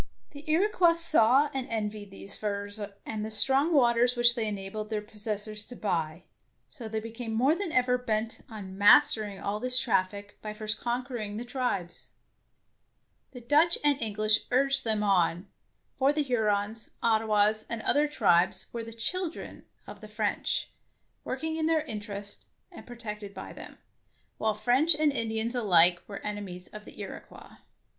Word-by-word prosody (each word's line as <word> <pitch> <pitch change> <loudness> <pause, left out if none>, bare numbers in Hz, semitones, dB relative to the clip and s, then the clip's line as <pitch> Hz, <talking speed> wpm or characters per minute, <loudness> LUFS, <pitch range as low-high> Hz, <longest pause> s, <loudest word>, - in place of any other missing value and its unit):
The 285 0 -11
Iroquois 345 0 +3
saw 290 -4 +5
and 265 -1 -4
envied 210 -2 -4
these 195 0 +1
furs 205 0 -2 0.2
and 215 -1 -5
the 215 - -4
strong 270 +8 +4
waters 245 -4 +3
which 240 0 +7
they 230 -3 -2
enabled 210 +1 -6
their 215 -1 -2
pos 210 +1 -5
sessors 210 0 -1
to 245 - -9
buy, 170 -6 -3 0.5
so 240 -7 -9
they 220 0 -3
became 225 +1 -7
more 260 +7 +3
than 350 0 -3
ever 250 -2 +1
bent 225 -2 -3
on 200 -4 -9
mastering 210 -2 +4
all 205 +1 -3
this 255 +2 +4
99 190 - +3
DEEDS - - -15
OF - - -24
DARING 200 -1 -8
traffic - - -34
by 215 -1 -6
first 215 0 -2
conquering 240 -4 -4
the 240 - -6
tribes. 240 -9 0 1.2
The 250 - -10
Dutch 300 +8 +2
and 290 -2 +3
English 215 0 +2
urged 275 +1 +1
them 215 -2 +1
on, 180 -2 +1 0.5
for 270 +1 +3
the 300 0 -1
Hurons, 215 -3 -1
Ottawas, 215 -1 +2
and 230 -2 -1
other 295 +6 +3
tribes 190 - +1
were 235 -1 -4
the 230 0 -10
"children'' 340 +9 -4 0.2
of 205 - -12
the 215 - -10
French, 210 -1 -2 0.5
working 320 +5 -4
in 315 -1 -1
their 320 -2 +1
interests 205 -5 -5 0.2
and - - -13
protected 210 -4 -8
by 190 - -8
them, - - -12 0.6
while 215 -1 0
French 255 +9 +3
and 300 0 +2
Indians 225 -2 -2
alike 180 -7 +4
were 200 - -7
enemies 200 -4 -6
of 210 0 -11
the - - -14
Iroquois. - - -10
220 Hz, 165 wpm, -28 LUFS, 210-255 Hz, 1.2 s, which